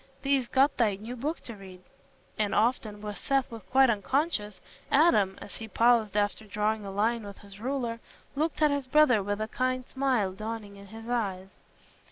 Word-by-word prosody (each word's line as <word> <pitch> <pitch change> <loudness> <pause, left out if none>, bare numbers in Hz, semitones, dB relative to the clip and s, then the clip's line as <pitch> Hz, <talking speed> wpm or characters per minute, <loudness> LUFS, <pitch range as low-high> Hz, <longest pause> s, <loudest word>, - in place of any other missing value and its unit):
Thee'st 275 -3 +1
got 275 +2 +3
thy 215 -5 +2
new 220 +5 -7
book 295 +7 -3
to 235 - -8
read." 190 -2 -12 0.5
And 210 -2 0
often, 215 -2 0
when 210 -1 -4
Seth 270 +4 -1
was 225 -1 -7
quite 265 +1 +6
unconscious, 215 - 0 0.3
Adam, 215 - +4
as - - -9
he 225 - -7
paused 225 -2 +3
after 205 +1 0
drawing 210 +2 -1
a 200 - -6
line 225 +4 +1
with 200 -2 -9
his 200 -1 -13
ruler, 240 -1 -2 0.4
looked 310 +2 0
at 300 - +5
his 285 -2 -2
brother 255 -5 +5
with 205 +1 -2
a 215 - -2
kind 255 +2 -1
smile 255 -9 0
dawning 215 0 -6
in 200 0 -13
his 225 +3 -10
eyes. 195 -6 -2
225 Hz, 185 wpm, -28 LUFS, 205-260 Hz, 0.5 s, quite